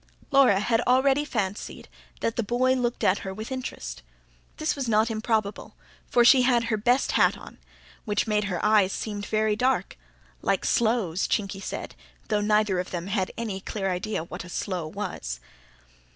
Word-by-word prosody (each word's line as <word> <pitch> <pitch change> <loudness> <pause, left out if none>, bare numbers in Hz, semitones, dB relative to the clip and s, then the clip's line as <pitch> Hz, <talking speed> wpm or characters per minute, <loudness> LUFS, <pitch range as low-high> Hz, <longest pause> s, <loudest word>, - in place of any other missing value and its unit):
Laura 270 -8 +5
had 225 +2 +1
already 265 +3 +4
fancied 205 -8 -4 0.3
that 230 - -1
the - - +1
boy 245 +4 +2
looked 245 -2 -1
at 190 - +3
her 190 - -5
with 215 +5 -7
interest. 65 - -5 0.6
This 310 0 0
was 270 -4 -3
not 220 +1 +3
improbable; 220 -2 -2 0.3
for 240 -1 +4
she 255 +2 +7
had 245 -2 +3
her 230 -1 0
best 245 +5 +2
hat - - +3
on, - - -13 0.4
which 205 -1 0
made 210 -2 +1
her 180 -4 -2
eyes 210 -3 +4
seem 205 0 -4
very 215 0 +1
dark 255 +4 0 0.4
"like - - 0
sloes," 220 -7 +1
Chinky 195 -1 -1
said, - - -5 0.4
though 210 -1 +1
neither 210 -2 +2
of 180 - -3
them 175 -1 -4
had 195 -1 -1
any 220 -5 -3
clear 195 -1 -2
idea 180 0 -2
what 170 - -7
a 180 - -11
sloe 175 -2 -3
was. 155 - -5
215 Hz, 170 wpm, -26 LUFS, 195-240 Hz, 0.6 s, she